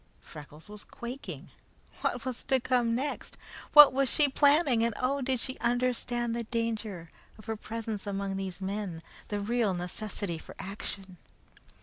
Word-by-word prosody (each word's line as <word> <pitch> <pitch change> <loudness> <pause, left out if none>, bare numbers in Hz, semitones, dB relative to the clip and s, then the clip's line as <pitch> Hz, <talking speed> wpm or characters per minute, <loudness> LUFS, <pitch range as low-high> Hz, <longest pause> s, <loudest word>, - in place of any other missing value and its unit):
Freckles 150 +2 -12
was 210 0 -10
quaking. 250 +4 -8 0.5
What 245 0 -1
was 255 -2 -4
to 265 -1 +3
come 240 -2 +1
next? 280 +4 -3 0.4
What 295 -3 +11
was 270 -1 +2
she 295 +3 +5
planning, 280 -3 +4
and 230 -2 0
oh! 275 +2 0
did 260 -1 0
she 260 +2 -3
understand 240 -1 0
the 235 - -2
danger 220 -7 -3 0.3
of 215 - -14
her 225 0 -2
presence 220 -1 -5
among 195 -1 -2
those 190 -1 -5
men; 190 -4 -4 0.2
the 205 - -2
real 215 -2 +1
necessity 180 0 -4
for - - -12
action? 195 -1 -7
230 Hz, 150 wpm, -30 LUFS, 195-250 Hz, 0.5 s, What